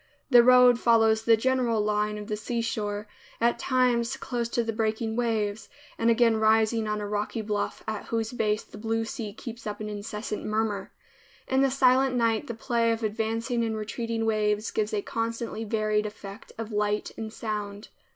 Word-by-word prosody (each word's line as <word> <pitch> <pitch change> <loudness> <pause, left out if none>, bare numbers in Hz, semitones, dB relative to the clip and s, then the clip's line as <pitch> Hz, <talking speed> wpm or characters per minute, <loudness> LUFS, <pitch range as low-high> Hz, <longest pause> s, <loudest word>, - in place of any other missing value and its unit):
The 245 -1 +9
road 250 0 +6
follows 225 -2 +4
the 225 0 +4
general 245 -1 +1
line 210 0 0
of 210 - -6
the 210 0 -2
seashore, 215 -2 -3 0.3
at 235 +1 +2
times 250 -1 +1
close 240 -3 -3
to 235 - 0
the 225 0 -2
breaking 220 0 -1
waves, 220 -3 -1 0.3
and 230 - +1
again 230 -1 +4
rising 220 0 +3
on 210 0 -1
a 205 - -4
rocky 210 +2 -2
bluff 210 -1 -3
at 215 -1 -4
whose 225 -1 -2
base 215 -3 0
the 210 - -13
blue 225 +1 -1
sea 220 -1 -5
keeps 230 +2 -8
up 205 0 -4
an 215 0 -4
incessant 210 +1 -5
murmur. 215 -2 -1 0.6
In 265 0 +2
the 275 - +4
silent 260 0 +3
night 230 -2 +1
the 235 - -4
play 230 0 +1
of 225 0 -2
advancing 225 +2 -1
and 220 -1 -1
retreating 225 +1 -3
waves 215 -1 +1
gives 215 0 -1
a 205 -2 -1
constantly 230 0 -3
varied 215 -1 0
effect 200 -1 -10
of 225 0 -5
light 210 0 0
and 220 -1 -6
sound. 210 -2 -5
225 Hz, 180 wpm, -27 LUFS, 210-235 Hz, 0.6 s, The